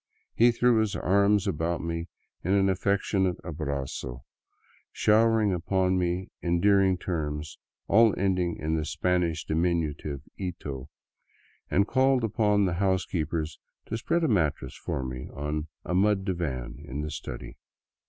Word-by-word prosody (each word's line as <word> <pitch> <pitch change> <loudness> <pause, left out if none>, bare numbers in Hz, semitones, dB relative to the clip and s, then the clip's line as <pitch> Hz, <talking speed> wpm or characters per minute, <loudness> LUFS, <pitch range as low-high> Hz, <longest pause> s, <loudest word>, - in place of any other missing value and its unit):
He 120 +1 +5
threw 120 -1 +3
his 110 -2 0
arms 100 +1 +3
about 85 -2 -1
me 85 0 -3 0.4
in 95 - +1
an 100 -1 +4
affectionate 95 -1 +1
ahrazo, 70 -6 -4 0.7
showering 110 -1 +3
upon 95 +1 +1
me 90 +1 -1
endearing 95 +2 +3
terms, 75 -4 -4 0.3
all 110 0 +5
ending 90 -3 0
in 80 +1 -1
the 80 - 0
Spanish 85 0 0
diminutive 80 -4 -1 0.2
ito, 75 -7 -5 0.8
and 100 +2 +3
called 130 -1 +3
upon 105 -2 +2
the 90 - 0
housekeepers 85 -5 -1 0.3
to 110 - -1
spread 170 +9 0
a - - +3
mattress 80 - 0
for 65 - -3
me 65 0 -6
on 75 +2 -3 0.2
a - - -2
mud 95 +1 +2
divan 70 -10 -3
in 70 -1 -5
the 75 0 -4
study. - - -7
90 Hz, 135 wpm, -27 LUFS, 75-100 Hz, 0.8 s, He